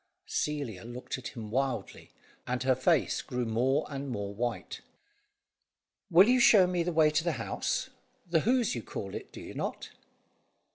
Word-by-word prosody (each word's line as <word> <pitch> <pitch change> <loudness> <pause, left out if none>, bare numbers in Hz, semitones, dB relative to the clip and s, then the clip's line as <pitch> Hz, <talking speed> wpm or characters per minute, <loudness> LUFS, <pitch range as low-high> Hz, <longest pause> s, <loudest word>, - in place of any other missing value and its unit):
Celia 140 -11 -2
looked 120 +2 -6
at 130 - -6
him 110 -3 -8
wildly, 130 -4 -2 0.4
and 125 0 -1
her 130 0 +4
face 135 +4 +2
grew 125 -1 -3
more 125 +6 +1
and 140 -1 -5
more 100 -4 -4
white. 120 +3 -4 1.3
"Will 185 +3 +7
you 255 +1 +4
show 210 -5 +7
me 180 -1 0
the 175 +1 -1
way 155 -2 +4
to 155 +1 +1
the 170 -1 0
house? 115 -4 -2 0.4
The 165 -1 +3
Hoze 240 +5 +2
you 120 - -3
call 100 -2 -6
it, - - -7
do - - -10
you - - -9
not?" - - -4
135 Hz, 170 wpm, -30 LUFS, 120-165 Hz, 1.3 s, Will